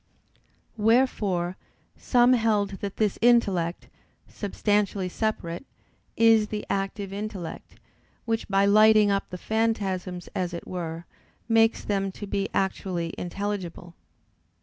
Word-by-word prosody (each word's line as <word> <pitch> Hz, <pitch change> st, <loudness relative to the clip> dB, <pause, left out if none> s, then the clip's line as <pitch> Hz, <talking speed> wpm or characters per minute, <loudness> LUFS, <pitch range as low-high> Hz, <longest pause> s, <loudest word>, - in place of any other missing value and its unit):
Wherefore 210 Hz, -6 st, +1 dB, 0.4 s
some 245 Hz, 0 st, +4 dB
held 215 Hz, -4 st, +2 dB
that 200 Hz, -1 st, -5 dB
this 210 Hz, -3 st, 0 dB
intellect, 195 Hz, -8 st, +2 dB, 0.4 s
substantially 205 Hz, -1 st, -1 dB
separate, 180 Hz, -4 st, -3 dB, 0.5 s
is 225 Hz, -2 st, +5 dB
the 210 Hz, 0 st, -5 dB
active 195 Hz, 0 st, -3 dB
intellect, 200 Hz, -5 st, -6 dB, 0.5 s
which 225 Hz, -1 st, -1 dB
by 195 Hz, 0 st, +3 dB
lighting 215 Hz, 0 st, +6 dB
up 195 Hz, 0 st, -1 dB
the 180 Hz, -, -6 dB
phantasms 195 Hz, -4 st, -2 dB
as 180 Hz, -2 st, -2 dB
it 170 Hz, -, -7 dB
were, 170 Hz, -2 st, -5 dB, 0.4 s
makes 225 Hz, 0 st, +3 dB
them 195 Hz, -1 st, -1 dB
to 205 Hz, -, -7 dB
be 200 Hz, 0 st, -2 dB
actually 185 Hz, -3 st, -2 dB
intelligible. 180 Hz, -2 st, -5 dB
200 Hz, 110 wpm, -26 LUFS, 185-220 Hz, 0.5 s, lighting